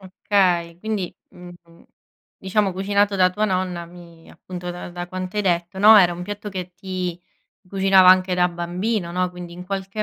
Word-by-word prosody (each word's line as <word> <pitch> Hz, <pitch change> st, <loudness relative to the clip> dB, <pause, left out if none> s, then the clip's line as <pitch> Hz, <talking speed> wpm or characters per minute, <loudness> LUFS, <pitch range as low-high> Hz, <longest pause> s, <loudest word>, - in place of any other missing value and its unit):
Okay, 180 Hz, -3 st, 0 dB
quindi 210 Hz, -2 st, -3 dB, 0.2 s
mh-mh, 175 Hz, -1 st, -15 dB, 0.6 s
diciamo 195 Hz, +1 st, 0 dB
cucinato 200 Hz, +2 st, +1 dB
da 185 Hz, -1 st, +4 dB
tua 210 Hz, +4 st, -1 dB
nonna 185 Hz, -3 st, -2 dB
mi 170 Hz, -1 st, -15 dB
appunto 180 Hz, -1 st, -8 dB
da 175 Hz, 0 st, -8 dB
da 175 Hz, 0 st, -6 dB
quanto 185 Hz, +2 st, -6 dB
hai 210 Hz, -, +1 dB
detto, 175 Hz, 0 st, -1 dB
no, 215 Hz, +2 st, +8 dB
era 180 Hz, -4 st, +5 dB
un 175 Hz, +1 st, -7 dB
piatto 205 Hz, +2 st, -6 dB
che 185 Hz, -2 st, -6 dB
ti 185 Hz, -2 st, -5 dB, 0.5 s
cucinava 195 Hz, -1 st, +5 dB
anche 185 Hz, 0 st, +5 dB
da 180 Hz, 0 st, +2 dB
bambino, 175 Hz, +2 st, -3 dB
no, 180 Hz, 0 st, -1 dB
quindi 180 Hz, -1 st, -10 dB
in 180 Hz, +1 st, -9 dB
qualche 195 Hz, +2 st, -4 dB
185 Hz, 175 wpm, -22 LUFS, 175-195 Hz, 0.6 s, no